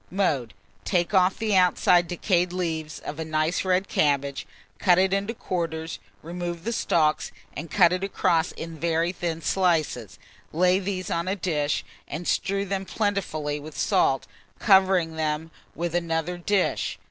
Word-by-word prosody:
Mode. 155 Hz, -, 0 dB, 0.3 s
Take 175 Hz, 0 st, 0 dB
off 185 Hz, -1 st, +4 dB
the 215 Hz, -3 st, 0 dB
outside 180 Hz, -1 st, +4 dB
decayed 175 Hz, 0 st, +1 dB
leaves 160 Hz, -4 st, -3 dB
of 150 Hz, -, -6 dB
a -, -, -1 dB
nice 155 Hz, +2 st, 0 dB
red 185 Hz, +1 st, +1 dB
cabbage, 140 Hz, -2 st, 0 dB, 0.3 s
cut 180 Hz, -3 st, +4 dB
it 190 Hz, +1 st, +3 dB
in 200 Hz, 0 st, 0 dB
quarters, 165 Hz, -5 st, -3 dB, 0.2 s
remove 175 Hz, 0 st, -5 dB
the 230 Hz, +3 st, -2 dB
stalks, 155 Hz, -8 st, +1 dB, 0.2 s
and 160 Hz, +3 st, -6 dB
cut 180 Hz, -3 st, +5 dB
it 185 Hz, +1 st, -2 dB
across 180 Hz, -3 st, +1 dB
in 165 Hz, -1 st, -8 dB
very 165 Hz, +1 st, +1 dB
thin 165 Hz, -3 st, -4 dB
slices. 160 Hz, -, 0 dB, 0.3 s
Lay 180 Hz, +3 st, +3 dB
these 185 Hz, -2 st, -3 dB
on 170 Hz, +1 st, -1 dB
a 190 Hz, -, 0 dB
dish, 150 Hz, -6 st, -1 dB, 0.2 s
and 165 Hz, +4 st, -5 dB
strew 200 Hz, +1 st, 0 dB
them 195 Hz, 0 st, -2 dB
plentifully 180 Hz, -8 st, -2 dB
with 155 Hz, +2 st, -10 dB
salt, -, -, +2 dB, 0.3 s
covering 190 Hz, -5 st, +4 dB
them 155 Hz, +1 st, -2 dB, 0.2 s
with 170 Hz, 0 st, -3 dB
another 170 Hz, 0 st, -1 dB
dish. 185 Hz, +2 st, 0 dB
175 Hz, 150 wpm, -25 LUFS, 160-185 Hz, 0.3 s, cut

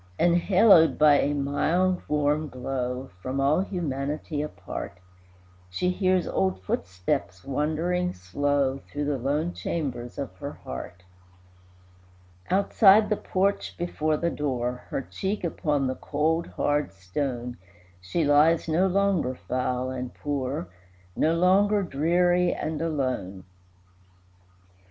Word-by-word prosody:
Enhaloed 175 Hz, +1 st, +5 dB
by 150 Hz, -1 st, +6 dB
a 145 Hz, -, +1 dB
mild, 170 Hz, +6 st, +1 dB
warm 150 Hz, +1 st, +1 dB
glow, 125 Hz, 0 st, -4 dB
From 130 Hz, +4 st, -3 dB
all 140 Hz, +4 st, +3 dB
humanity 150 Hz, -5 st, -3 dB
apart, 150 Hz, -10 st, -6 dB, 0.7 s
She 180 Hz, -, 0 dB
hears 185 Hz, -1 st, +1 dB
old 95 Hz, 0 st, 0 dB
footsteps 90 Hz, 0 st, -2 dB
wandering 160 Hz, +6 st, -1 dB
slow 135 Hz, +9 st, 0 dB
Through 145 Hz, +1 st, -5 dB
the 145 Hz, -2 st, -1 dB
lone 150 Hz, +7 st, -1 dB
chambers 125 Hz, -7 st, -4 dB
of 135 Hz, -9 st, -5 dB
her -, -, -6 dB
heart. 90 Hz, +8 st, -8 dB, 1.5 s
Outside 200 Hz, +2 st, +5 dB
the 210 Hz, -, +2 dB
porch 195 Hz, 0 st, -1 dB
before 155 Hz, -3 st, -1 dB
the 170 Hz, +1 st, -1 dB
door, 125 Hz, -4 st, -2 dB
Her 135 Hz, -, -2 dB
cheek 195 Hz, +8 st, -4 dB
upon 150 Hz, -4 st, 0 dB
the 130 Hz, -, 0 dB
cold, 160 Hz, +5 st, -1 dB
hard 145 Hz, 0 st, -1 dB
stone, 120 Hz, +6 st, -4 dB, 0.4 s
She 95 Hz, -, -1 dB
lies, 150 Hz, +3 st, +4 dB
no 170 Hz, +4 st, +2 dB
longer 190 Hz, -8 st, +1 dB
foul 125 Hz, 0 st, -2 dB
and 125 Hz, -1 st, -5 dB
poor, 140 Hz, -6 st, -3 dB, 0.5 s
No 160 Hz, +2 st, +2 dB
longer 200 Hz, +4 st, +3 dB
dreary 175 Hz, +3 st, +2 dB
and 155 Hz, 0 st, -3 dB
alone. 130 Hz, -, -2 dB
150 Hz, 115 wpm, -26 LUFS, 130-175 Hz, 1.5 s, by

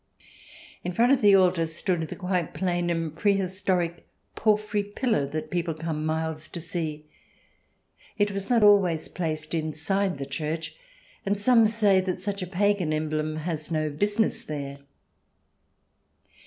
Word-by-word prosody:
In 180 Hz, -, -3 dB
front 240 Hz, +6 st, +4 dB
of 275 Hz, -, +4 dB
the 205 Hz, -2 st, +7 dB
altar 180 Hz, -3 st, +3 dB
stood 170 Hz, +2 st, -1 dB
the -, -, -6 dB
quite 180 Hz, -3 st, -2 dB
plain 175 Hz, -2 st, 0 dB
and 165 Hz, -2 st, -2 dB
prehistoric 190 Hz, -2 st, 0 dB, 0.3 s
porphyry 210 Hz, -1 st, +1 dB
pillar 205 Hz, -, -1 dB
that 155 Hz, +2 st, -5 dB
people 170 Hz, -2 st, -1 dB
come 155 Hz, -1 st, -3 dB
miles 160 Hz, 0 st, -2 dB
to 170 Hz, -, -6 dB
see. 160 Hz, -2 st, -4 dB, 1.1 s
It 205 Hz, -1 st, +2 dB
was 195 Hz, 0 st, -5 dB
not 235 Hz, -3 st, +4 dB
always 190 Hz, -6 st, +4 dB
placed 155 Hz, -2 st, -3 dB
inside 165 Hz, +4 st, -1 dB
the 135 Hz, -, -4 dB
church, 155 Hz, +4 st, -4 dB, 0.5 s
and 200 Hz, 0 st, 0 dB
some 230 Hz, 0 st, +5 dB
say 210 Hz, -3 st, +3 dB
that 185 Hz, -1 st, -2 dB
such 200 Hz, +1 st, -3 dB
a 180 Hz, -, -3 dB
pagan 195 Hz, -2 st, +1 dB
emblem 155 Hz, 0 st, -1 dB
has 155 Hz, -1 st, -4 dB
no 155 Hz, -2 st, 0 dB
business 205 Hz, +8 st, 0 dB
there. 140 Hz, -2 st, -5 dB
175 Hz, 140 wpm, -26 LUFS, 155-200 Hz, 1.1 s, the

